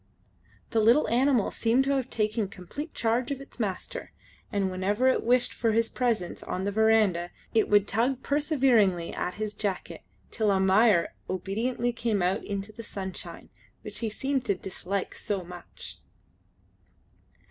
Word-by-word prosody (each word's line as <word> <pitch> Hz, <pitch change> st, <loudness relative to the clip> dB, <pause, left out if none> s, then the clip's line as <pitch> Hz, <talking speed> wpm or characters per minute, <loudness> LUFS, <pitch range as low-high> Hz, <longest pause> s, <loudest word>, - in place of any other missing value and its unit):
The 225 Hz, -, +2 dB
little 235 Hz, +7 st, +5 dB
animal 250 Hz, -2 st, +3 dB
seemed 235 Hz, +3 st, +2 dB
to 275 Hz, -, 0 dB
have 265 Hz, -2 st, 0 dB
taken 215 Hz, -1 st, 0 dB
complete 205 Hz, -, -8 dB
charge 235 Hz, +2 st, +1 dB
of 280 Hz, -2 st, -3 dB
its 275 Hz, -, -12 dB
master, 200 Hz, -5 st, -4 dB, 0.4 s
and 195 Hz, -3 st, 0 dB
whenever 205 Hz, +7 st, +1 dB
it 260 Hz, -, +3 dB
wished 245 Hz, +1 st, +2 dB
for 225 Hz, -2 st, +1 dB
his 230 Hz, +1 st, +2 dB
presence 230 Hz, -8 st, -1 dB
on 185 Hz, -, -3 dB
the 200 Hz, -, 0 dB
verandah 210 Hz, -5 st, +3 dB, 0.2 s
it 220 Hz, -, +3 dB
would 205 Hz, -1 st, +4 dB
tug 250 Hz, +5 st, 0 dB
perseveringly 255 Hz, -, +2 dB
at 180 Hz, -, -3 dB
his 215 Hz, 0 st, -3 dB
jacket, 200 Hz, -3 st, -3 dB, 0.3 s
till 220 Hz, -3 st, +1 dB
Almayer 195 Hz, 0 st, +4 dB, 0.2 s
obediently 225 Hz, +6 st, -1 dB
came 225 Hz, -5 st, 0 dB
out 185 Hz, +2 st, +1 dB
into 200 Hz, +1 st, -4 dB
the 230 Hz, -, -9 dB
sunshine, 190 Hz, -4 st, -7 dB, 0.3 s
which -, -, -5 dB
he 230 Hz, -, -1 dB
seemed 265 Hz, +4 st, -1 dB
to 200 Hz, -, +2 dB
dislike 190 Hz, +1 st, -4 dB
so 200 Hz, -3 st, -3 dB
much. 175 Hz, 0 st, -10 dB
215 Hz, 150 wpm, -28 LUFS, 195-245 Hz, 0.4 s, little